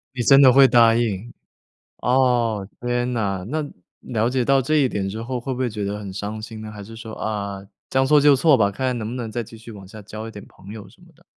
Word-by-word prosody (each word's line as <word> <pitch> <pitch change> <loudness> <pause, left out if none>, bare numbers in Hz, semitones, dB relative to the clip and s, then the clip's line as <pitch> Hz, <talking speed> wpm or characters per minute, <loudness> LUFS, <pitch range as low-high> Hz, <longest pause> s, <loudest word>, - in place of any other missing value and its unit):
你 125 - -1
真 135 +3 +6
的 130 -2 +8
会 135 +1 +7
答 115 -2 +5
应。 115 -1 -2 0.7
哦， 120 -5 +1
天 120 0 -1
哪， 100 -5 -2
那 155 +2 -2 0.3
了 115 -1 -1
解 125 -1 0
到 135 +1 +3
这 155 +5 0
一 140 -3 +3
点 100 -5 -3
之 110 +3 -6
后 125 +2 -4
会 130 +2 -4
不 125 - -7
会 130 -2 0
觉 105 -2 -5
得 100 +1 -3
很 100 -2 -8
伤 105 +2 -5
心 110 0 -8
呢？ 110 0 -8
还 105 -1 -9
是 115 +3 -11
说， 115 -1 -9
啊， 100 -3 -4 0.2
将 135 0 +2
错 150 +2 +5
就 145 -1 +6
错 145 +3 +4
吧， 100 -5 +2
看 130 +6 -3
看 125 -1 -1
能 110 -2 -4
不 - - -6
能 120 -3 -5
再 120 +2 -3
继 115 +1 -13
续 115 +1 -12
往 100 -2 -11
下 105 +3 -11
交 110 +2 -8
一 - - -8
点 105 -2 -11
朋 100 - -14
友 105 -2 -9
什 - - -21
么 - - -18
的？ - - -26
115 Hz, 285 characters per minute, -22 LUFS, 105-125 Hz, 0.7 s, 的